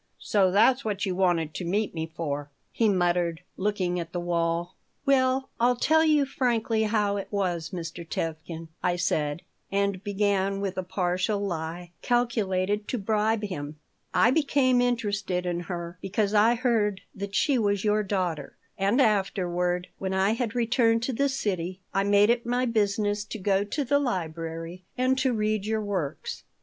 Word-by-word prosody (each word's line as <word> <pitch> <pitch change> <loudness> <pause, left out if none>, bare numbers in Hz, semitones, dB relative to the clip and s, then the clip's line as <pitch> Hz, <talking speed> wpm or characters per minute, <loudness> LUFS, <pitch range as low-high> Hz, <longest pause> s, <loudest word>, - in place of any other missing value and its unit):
"So 195 -3 +2
that's 235 +8 +4
what 205 -3 -1
you 190 - -1
wanted 175 -4 +1
to - - -4
meet 200 +5 0
me 160 -1 -3
for?" 145 -3 -4 0.2
he 225 -2 +2
muttered 175 -3 +1
looking 185 -3 -1
at 170 - -6
the 175 - -1
wall 170 +1 -1 0.3
"Well, 265 -1 +2
I'll 245 +1 +4
tell 320 +6 +3
you 305 -3 +4
frankly 235 -4 0
how 210 -2 +1
it 195 - -4
was, 180 -5 -1
Mr. 170 -1 -6
Tevkin," 165 0 -5
I 180 -1 +1
said, 155 -3 -1 0.3
and 200 -1 0
began 200 -1 0
with 195 -1 -2
a 185 - -1
partial 185 +2 -1
lie 175 -2 -4
calculated 210 -4 0
to 250 - -2
bribe 215 +1 +1
him: 155 -7 -4 0.4
"I 200 +6 +4
became 265 -4 +3
interested 205 -7 -1
in 175 -1 -1
her 175 0 -6
because 205 +1 0
I 220 +3 +5
heard 225 -5 +1
that 200 0 -6
she 280 -5 +3
was 205 -2 +1
your 210 0 +2
daughter, 180 -8 -2 0.2
and 200 +7 +2
afterward, 180 -5 +1
when 190 0 -2
I 190 +2 +3
had 230 -1 -2
returned 230 -1 +2
to 260 - -1
the 280 +4 +1
city, 185 -8 -2
I 195 - +2
made 205 +2 +5
it 240 0 0
my 245 +1 0
business 205 -2 +1
to 220 - -6
go 195 0 +1
to 280 +7 -2
the 285 +3 +3
library 165 - -4
and 255 +1 +2
to 260 -1 +2
read 215 -2 0
your 220 0 0
works. 185 -9 -3
200 Hz, 165 wpm, -27 LUFS, 175-225 Hz, 0.4 s, I